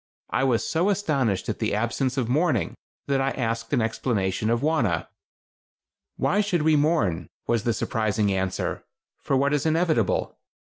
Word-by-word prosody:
I - - +1
was 125 -4 +1
so 170 +5 +1
astonished 140 - 0
at - - -3
the - - 0
absence 125 +4 -1
of 125 -4 0
mourning 130 - +1 0.3
that 135 -1 +1
I 135 - +1
asked 115 -3 -3
an 125 -6 +2
explanation 110 -3 -1
of 115 +1 +1
Wauna. 120 - +1 1.1
"Why 145 +10 +2
should 185 -6 0
we 155 0 +4
mourn," 110 - +1 0.2
was 115 -3 0
the 120 - +2
surprising 110 -2 0
answer, 95 -1 -2 0.4
"for 135 - 0
what 140 +2 +2
is 145 - +1
inevitable? 160 - +1
125 Hz, 160 wpm, -25 LUFS, 110-150 Hz, 1.1 s, we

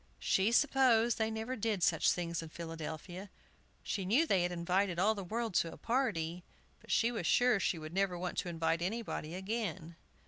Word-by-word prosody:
She 195 +4 +2
supposed 240 -4 +3
they 220 0 +1
never 220 +3 -3
did 215 -5 -1
such 165 -1 +3
things 170 -1 -2
in 165 - -8
Philadelphia; 165 +3 -7 0.5
she 200 - -2
knew 235 - +3
they 195 - +2
had 175 0 0
invited 180 +1 0
all 205 +5 +3
the 200 -2 -6
world 225 +3 -3
to 165 - -5
a - - -11
party, 180 -9 -1 0.4
but - - -20
she 230 +1 +3
was 220 -9 -3
sure 245 0 +4
she 185 - 0
would 155 0 -8
never 190 -2 0
want 180 +1 -4
to 180 - -3
invite 165 0 0
anybody 185 -4 -3
again. 190 -4 -4
190 Hz, 185 wpm, -33 LUFS, 170-225 Hz, 0.5 s, sure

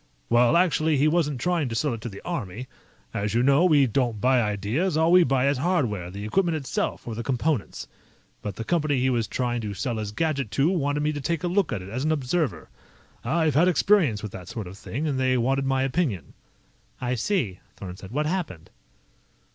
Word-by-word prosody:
"Well, 120 +6 +4
actually, 160 -3 +2
he 145 +3 +3
wasn't 155 -4 +1
trying 170 -5 0
to 115 - -4
sell 145 +2 0
it 115 - -6
to 120 - -5
the 100 - -11
Army. 125 - -4 0.5
As 105 +2 -2
you 120 - +3
know, 140 +6 +4
we 150 -6 +5
don't 120 -2 0
buy 125 +3 +3
ideas; 110 - -1
all 160 +1 +3
we 180 0 +7
buy 135 -2 +2
is 140 -2 +1
hardware, 125 - 0
the 100 +3 -7
equipment 170 - +1
itself, 135 -3 -3
or 115 - -3
the 115 - -4
components. 135 0 -2 0.5
But 105 -3 -5
the 115 - -5
company 150 0 +1
he 130 +1 +2
was 115 -3 0
trying 120 0 -2
to 105 -2 -5
sell 115 +4 -2
his 105 -1 -4
gadget 140 -2 -1
to 145 +6 +3
wanted 145 -4 0
me 150 0 +1
to 145 - -4
take 165 +4 -2
a - - +1
look 185 0 +1
at 95 - -3
it 95 - -9
as 125 +6 -3
an 155 - +1
observer. 135 - -1 0.6
I've 155 +4 +1
had 160 +6 +4
experience 175 - +3
with 105 - -5
that 90 -2 -9
sort 110 +1 -5
of 90 +2 -9
thing, 135 +8 -5
and 140 -4 -1
they 130 -1 +2
wanted 135 +3 +1
my 135 0 +1
opinion." 130 - -1 0.7
"I 125 0 -1
see," 115 - -1 0.2
Thorn 90 -2 -7
said. 95 0 -11
"What 150 +7 -1
happened?" 155 - -4
130 Hz, 215 wpm, -25 LUFS, 110-155 Hz, 0.7 s, we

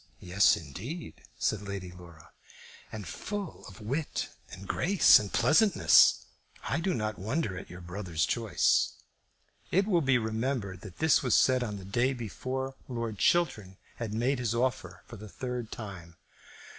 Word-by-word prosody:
"Yes, 95 +3 +3
indeed," 110 - -8 0.2
said 110 - 0
Lady 100 -3 -6
Laura. 85 -3 -15 0.6
"And 105 -5 -7
full 200 - -6
of 100 0 -12
wit 140 +9 -3 0.2
and 95 +1 -10
grace 195 +1 +5
and 105 -2 -6
pleasantness. 195 +3 +5 0.4
I 145 - 0
do 180 +1 0
not 110 -1 -3
wonder 110 - -2
at 90 - -8
your 90 +1 -10
brother's 85 -2 -2
choice." 115 -5 +1 0.8
It 195 +2 +2
will 180 -5 +2
be 135 -3 +3
remembered 110 -4 -2
that 95 -3 -11
this 160 -2 +3
was 125 -4 +2
said 130 -1 +4
on 105 -4 -4
the 95 - -10
day 120 +7 +1
before 130 +3 -4
Lord 115 -5 -4
Chiltern 110 - +1 0.2
had 115 -3 -4
made 120 +5 0
his 120 -2 -1
offer 105 -8 -2
for 115 - -11
the 105 +1 -10
third 125 0 -5
time. 95 -7 -8
110 Hz, 155 wpm, -29 LUFS, 95-130 Hz, 0.8 s, grace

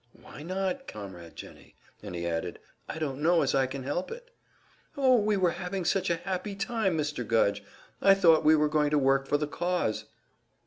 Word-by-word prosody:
"Why - - -12
not, 190 - -3
Comrade 90 -5 -9
Jennie?" - - -12 0.3
And 90 - -7
he 85 0 -4
added, 85 +1 -3 0.3
"I - - -5
don't 145 -3 -3
know 170 +2 +4
as - - 0
I 135 -1 +2
can 130 0 -6
help 145 +7 -3
it." - - -10 0.7
"Oh, 260 -2 +5
we 210 -1 +1
were 180 -3 +2
having 180 +1 -4
such 190 +2 +1
a 170 - +2
happy 190 +3 -4
time, 215 -4 -1
Mr. 150 -4 -2
Gudge! 100 -3 +1 0.4
I 195 0 +6
thought 165 -5 +5
we 155 +1 +6
were 150 0 +3
going 150 -1 +1
to 150 - +2
work 135 0 +2
for 145 - +2
the 150 - -1
cause!" 175 -6 -2
160 Hz, 195 wpm, -28 LUFS, 135-190 Hz, 0.7 s, I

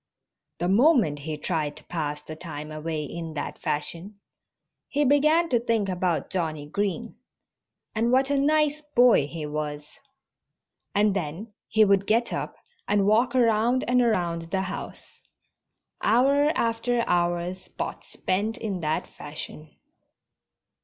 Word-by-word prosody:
The 175 - -1
moment 220 - +4
he 155 +1 -5
tried 150 -2 -2
to 155 - -11
pass 150 -3 -4
the 155 - -8
time 155 -2 -7
away 155 0 -3
in 160 +2 -6
that 145 - -4
fashion 170 +7 -3 0.7
he 290 +1 +1
began 305 +5 +4
to 240 - +3
think 225 -4 0
about 180 -2 -1
Johnnie 160 -5 -2
Green 205 +8 -3 0.8
and 230 +1 +1
what 265 +2 +3
a 285 - +2
nice 300 +1 +2
boy 245 - +4
he 155 0 -6
was. 150 0 -4 1.1
And 205 -1 +3
then 190 +5 -4
he 220 0 +4
would 200 -1 +3
get 235 +2 +2
up - - -4 0.3
and 205 -1 +2
walk 235 +5 +3
around 235 +1 +3
and 250 +1 +4
around 170 -8 0
the 190 +1 0
house. 190 0 -7 0.8
Hour 275 +6 +4
after 235 +1 0
hour 175 0 +1
Spot 185 0 -7
spent 205 +4 -2
in 205 -5 -3
that 155 -1 -1
fashion. 150 +1 -8
195 Hz, 135 wpm, -26 LUFS, 160-235 Hz, 1.1 s, moment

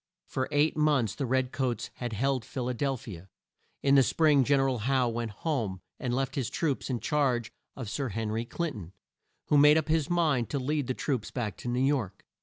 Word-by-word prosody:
For 130 -1 -2
eight 145 +2 +2
months 145 -8 +2
the 135 - -3
red 130 0 +1
coats 125 -5 -2
had 120 -2 -4
held 130 +3 0
Phil 125 +2 -4
a - - 0
del 135 +2 -1
phi 110 -7 -8
a. 90 +4 -15 0.6
In 140 - +4
the 140 - +7
spring 145 +1 +4
Gen 140 +2 +3
er 135 - +3
al 130 -2 0
Howe 130 +2 +2
went 115 0 -3
home, 110 - -2 0.2
and 125 - -2
left 135 0 -1
his 135 -5 -2
troops 145 -5 -1
in 125 -2 -1
charge 130 -7 0 0.2
of 130 -4 -6
Sir 135 +5 -2
Hen 110 +1 -3
ry 110 +1 -1
Clin 170 +6 -2
ton, 95 - -9 0.6
who 145 - +5
made 150 +2 +7
up 160 -1 -1
his 155 -2 +1
mind 155 -9 +1
to 145 - -1
lead 140 +1 -1
the 130 - -1
troops 125 -7 -2
back 110 -7 -3
to - - -8
New 125 +2 +1
York. 135 -9 -1
130 Hz, 225 wpm, -29 LUFS, 115-145 Hz, 0.6 s, the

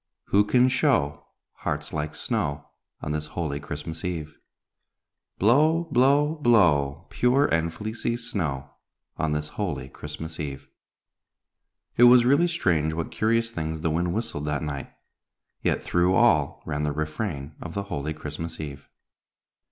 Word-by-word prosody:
Who 100 +1 +4
can 125 +4 +4
show 75 - +1 0.3
Hearts 75 0 -4
like 75 -1 -3
snow, 70 0 -2 0.3
On 75 - -3
this 75 0 -3
holy 75 -4 -1
Christmas 75 +3 -6
Eve? 80 -4 -4 1.0
Blow, 155 - +4
blow, 140 +5 +3
blow! 85 - +3
Pure 130 +4 +3
and 80 0 +1
fleecy 110 +5 -3
snow, 80 - -3 0.5
On 80 -1 0
this 75 0 -2
holy 65 - -4
Christmas 80 +3 -8
Eve." 70 -3 -5 1.3
It 120 - +8
was 120 0 +7
really 140 +7 +4
strange 85 - +1
what 80 -1 -3
curious 115 +1 +1
things 80 -4 -4
the 80 -1 0
wind 85 +2 0
whistled 110 -8 -3
that 75 0 -1
night, 70 -2 -5 0.7
yet - - 0
through 90 +2 +2
all 115 -13 +3
ran 75 -2 -2
the 75 -1 0
refrain 75 -1 -3
of 85 - -7
the 100 - -1
holy 75 -5 -4
Christmas 80 +2 -6
Eve. 70 -3 -7
80 Hz, 140 wpm, -26 LUFS, 75-115 Hz, 1.3 s, It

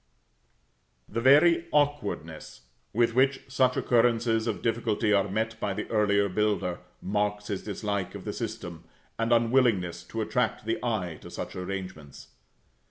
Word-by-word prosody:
The 115 - -3
very 165 +6 +5
awkwardness 125 - -1 0.3
with 115 +1 +2
which 135 +2 +3
such 130 -1 +2
occurrences 115 -1 +2
of 110 - -3
difficulty 115 -2 +1
are 100 0 +2
met 110 +3 -2
by 100 -2 -2
the - - -4
earlier 100 -2 +3
builder, 100 -2 0 0.2
marks 105 +1 -1
his 100 -2 -2
dislike 100 -2 -3
of - - -8
the - - -3
system, 85 -2 -6 0.4
and 115 +1 0
unwillingness 115 -8 +2
to 115 +5 -4
attract 110 -2 -1
the 115 +2 -2
eye 95 -9 -2
to - - -10
such - - -6
arrangements. 90 -6 -7
110 Hz, 140 wpm, -27 LUFS, 100-120 Hz, 0.4 s, very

